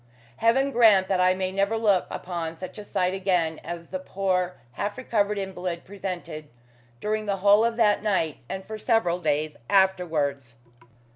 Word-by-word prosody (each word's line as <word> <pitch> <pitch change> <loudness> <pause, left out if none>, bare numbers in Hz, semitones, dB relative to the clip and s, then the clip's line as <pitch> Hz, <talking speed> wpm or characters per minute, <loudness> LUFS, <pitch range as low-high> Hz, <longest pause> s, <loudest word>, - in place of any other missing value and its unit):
Heaven 265 +5 +3
grant 215 -6 +5
that 190 -2 +1
I 185 0 +4
may 185 0 -2
never 200 +3 0
look 205 -5 +2
upon 165 -2 -5
such 185 +4 -8
a - - -7
sight 185 -2 -1
again 180 -4 0
as 170 0 -7
the 185 - -4
poor, 185 -1 -1
half 205 - -4
recovered 210 -5 0
invalid 185 -3 -4
presented 180 -6 -6 0.5
during 215 0 -2
the 200 -1 0
whole 205 +3 +5
of 230 0 0
that 210 -3 +3
night 185 -8 0
and 190 0 -5
for 220 0 -7
several 220 -7 +1
days 150 -2 -1
afterwards. 160 -10 +1
190 Hz, 160 wpm, -25 LUFS, 175-205 Hz, 0.5 s, grant